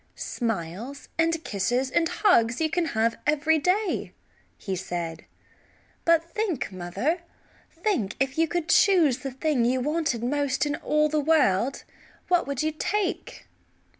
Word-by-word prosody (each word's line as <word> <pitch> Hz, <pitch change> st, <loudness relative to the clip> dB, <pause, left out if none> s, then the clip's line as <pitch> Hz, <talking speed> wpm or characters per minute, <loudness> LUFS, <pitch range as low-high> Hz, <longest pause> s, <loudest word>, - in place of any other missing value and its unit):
"Smiles 225 Hz, -, -4 dB
and 330 Hz, 0 st, +1 dB
kisses 245 Hz, +6 st, -1 dB
and 330 Hz, +3 st, +2 dB
hugs 250 Hz, -, +3 dB
you 315 Hz, -1 st, 0 dB
can 350 Hz, +1 st, +1 dB
have 230 Hz, +1 st, +1 dB
every 305 Hz, +2 st, +3 dB
day," 370 Hz, +6 st, 0 dB, 0.4 s
he 190 Hz, -, -4 dB
said, 170 Hz, -3 st, -5 dB, 0.8 s
"but 335 Hz, 0 st, +2 dB
think, 395 Hz, -, -2 dB
mother, 190 Hz, -, -2 dB, 0.5 s
think, 330 Hz, -, -1 dB
if 270 Hz, 0 st, 0 dB
you 325 Hz, 0 st, +2 dB
could 345 Hz, 0 st, -2 dB
choose 340 Hz, -8 st, +4 dB
the 275 Hz, -, -4 dB
thing 270 Hz, -1 st, 0 dB
you 250 Hz, +2 st, +2 dB
wanted 290 Hz, -3 st, -1 dB
most 285 Hz, +2 st, 0 dB
in 290 Hz, 0 st, -1 dB
all 300 Hz, 0 st, +2 dB
the 305 Hz, 0 st, 0 dB
world 275 Hz, -6 st, +2 dB, 0.5 s
what 355 Hz, -3 st, +2 dB
would 280 Hz, 0 st, -2 dB
you 310 Hz, -, +1 dB
take?" 410 Hz, +8 st, -3 dB
290 Hz, 140 wpm, -26 LUFS, 235-330 Hz, 0.8 s, choose